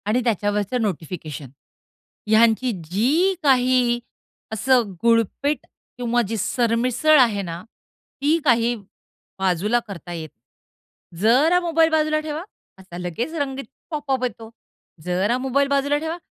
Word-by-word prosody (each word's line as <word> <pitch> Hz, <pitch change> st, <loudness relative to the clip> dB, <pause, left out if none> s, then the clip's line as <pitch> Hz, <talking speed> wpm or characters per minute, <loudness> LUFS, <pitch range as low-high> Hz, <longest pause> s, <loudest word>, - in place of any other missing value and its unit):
आणि 230 Hz, +4 st, +2 dB
त्याच्यावरच 205 Hz, -1 st, 0 dB
नोटिफिकेशन. 160 Hz, -, -4 dB, 0.8 s
ह्यांची 225 Hz, +3 st, +4 dB, 0.2 s
जी 295 Hz, -, +2 dB
काही 250 Hz, -3 st, +3 dB, 0.5 s
असं, 235 Hz, -1 st, +2 dB
गुळपेट 235 Hz, +6 st, +1 dB, 0.3 s
किंवा 240 Hz, 0 st, +1 dB
जी 225 Hz, +2 st, -3 dB
सरमिसळ 240 Hz, +8 st, +2 dB
आहे 225 Hz, -6 st, +3 dB
ना, 170 Hz, -1 st, -6 dB, 0.6 s
ती 300 Hz, +3 st, +3 dB
काही 240 Hz, -2 st, +3 dB, 0.6 s
बाजूला 190 Hz, +5 st, +1 dB
करता 175 Hz, -3 st, -8 dB
येत 160 Hz, -2 st, -6 dB, 0.9 s
जरा 280 Hz, -, +4 dB
मोबाईल 330 Hz, -2 st, +2 dB
बाजूला 310 Hz, -1 st, +2 dB
ठेवा, 310 Hz, +1 st, -5 dB, 0.4 s
असा 185 Hz, -2 st, -11 dB
लगेच 180 Hz, -, -4 dB
रंगीत 275 Hz, -3 st, -3 dB, 0.2 s
पॉप 295 Hz, -3 st, -4 dB
अप 260 Hz, -1 st, 0 dB
येतो. 225 Hz, -2 st, -4 dB, 0.5 s
जरा 185 Hz, +7 st, 0 dB
मोबाईल 265 Hz, +2 st, +1 dB
बाजूला 280 Hz, +1 st, +1 dB
ठेवा, 320 Hz, +3 st, -4 dB
240 Hz, 120 wpm, -22 LUFS, 205-280 Hz, 0.9 s, ह्यांची